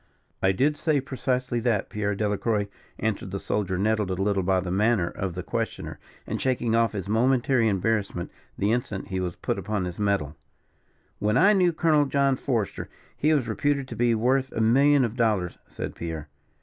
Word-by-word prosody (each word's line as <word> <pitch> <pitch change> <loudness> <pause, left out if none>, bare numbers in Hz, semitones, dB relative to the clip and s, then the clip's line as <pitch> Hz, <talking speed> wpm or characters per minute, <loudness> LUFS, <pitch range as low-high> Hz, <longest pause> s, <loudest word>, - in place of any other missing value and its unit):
"I 95 - +4
did 140 +10 +1
say 155 -2 +1
precisely 130 -2 -2
that, 115 -4 0
Pierre 105 -1 -1
Delacroix," 105 0 0 0.3
answered 105 -3 -2
the 100 +1 -4
soldier, 95 -3 -1
nettled 105 0 +1
a 95 - -1
little 95 +1 +1
by 95 0 +2
the 90 -1 -4
manner 105 -1 +2
of 90 0 -4
the 90 - -4
questioner, - - -4 0.3
and - - -4
shaking 125 -3 0
off 115 0 +2
his 100 -2 -4
momentary 120 +2 +2
embarrassment 100 -3 -1 0.3
the 100 +2 +1
instant 115 -5 -2
he 95 - -2
was 90 -1 -3
put - - -2
upon 105 -3 -2
his 90 +1 -6
mettle. 100 -8 0 0.8
"When 105 +3 +1
I 205 +8 +6
knew 180 -3 +4
Colonel 155 -3 +3
John 140 -1 +2
Forester, 120 -6 -2 0.3
he 155 - +2
was 140 -6 +2
reputed 140 +4 0
to 115 - -6
be 120 +1 +2
worth 130 +4 +1
a - - -3
million 135 +5 +4
of 115 0 -4
dollars," 105 -7 0
said - - -6
Pierre. 80 -3 -6
110 Hz, 185 wpm, -26 LUFS, 95-130 Hz, 0.8 s, I